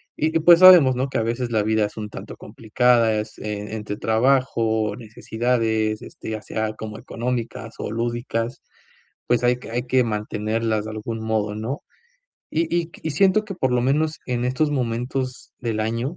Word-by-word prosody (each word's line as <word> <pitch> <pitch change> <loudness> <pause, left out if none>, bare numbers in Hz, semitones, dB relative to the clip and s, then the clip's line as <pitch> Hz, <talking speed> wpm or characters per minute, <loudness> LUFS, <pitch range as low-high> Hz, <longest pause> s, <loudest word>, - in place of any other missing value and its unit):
Y 160 +2 -1
y - - 0
pues, 170 +1 +7
sabemos 175 -9 +9
¿no? 130 +2 -1
Que - - -1
a - - 0
veces 120 0 -4
la 110 -2 +2
vida 110 0 +2
es 105 - -8
un 105 -1 -5
tanto - - -9
complicada. 115 +1 +2
Es, 105 0 -7
eh, 105 0 -5
entre 105 -1 -5
trabajo, 115 -2 +1
necesidades, 110 -1 -1
este, - - -8
ya 110 -1 -4
sea 110 0 -3
como 110 0 -7
económicas 115 -2 -4
o - - -4
lúdicas, 120 +1 -3 0.7
pues, 120 0 +2
hay 120 0 +4
que 125 - -10
hay 120 +2 -1
que 125 0 +3
mantenerlas 110 0 -1
de 110 - -6
algún 110 +1 -5
modo 110 -2 -1
¿no? 115 +9 -4 0.7
Y 160 - +1
y 170 -1 0
y 160 - -2
siento 195 +7 +3
que 205 -2 -6
por 130 -8 0
lo 125 - +2
menos 150 +4 0
en 125 -1 -1
estos 130 +5 +1
momentos 125 0 -3
del 115 -3 -2
año, 115 +8 -2
115 Hz, 180 wpm, -23 LUFS, 110-130 Hz, 0.7 s, sabemos